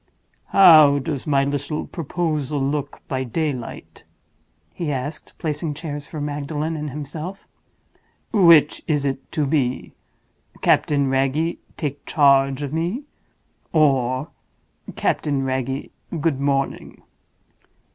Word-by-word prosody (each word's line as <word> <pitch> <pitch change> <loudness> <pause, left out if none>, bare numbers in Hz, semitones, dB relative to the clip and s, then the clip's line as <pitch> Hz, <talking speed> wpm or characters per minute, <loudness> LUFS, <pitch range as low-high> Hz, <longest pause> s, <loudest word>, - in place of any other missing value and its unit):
"How 155 -7 +7
does 140 0 -4
my 140 -2 +3
little 145 +2 -2
proposal 155 -3 -2
look 140 +1 -3
by 130 -1 -2
daylight?" 130 -1 -4 0.7
he 160 -4 -3
asked, 145 +3 -5
placing 150 -1 -3
chairs 145 -2 -6
for 155 - -7
Magdalen 150 +2 -3
and 150 -1 -4
himself. 150 +7 -7 0.9
"Which 170 -7 +6
is 150 -3 +1
it 135 -1 -3
to 150 - +1
be: 135 -4 -1 0.7
'Captain 140 -2 +3
Wragge, 135 +5 0 0.2
take 145 -3 -4
charge 140 -1 +3
of 145 0 -4
me?' 175 - -2 0.7
or, 135 -3 +2 0.7
'Captain 140 -3 0
Wragge, 130 +1 -2 0.3
good 145 -3 0
morning? 140 -1 -2
145 Hz, 105 wpm, -22 LUFS, 135-155 Hz, 0.9 s, How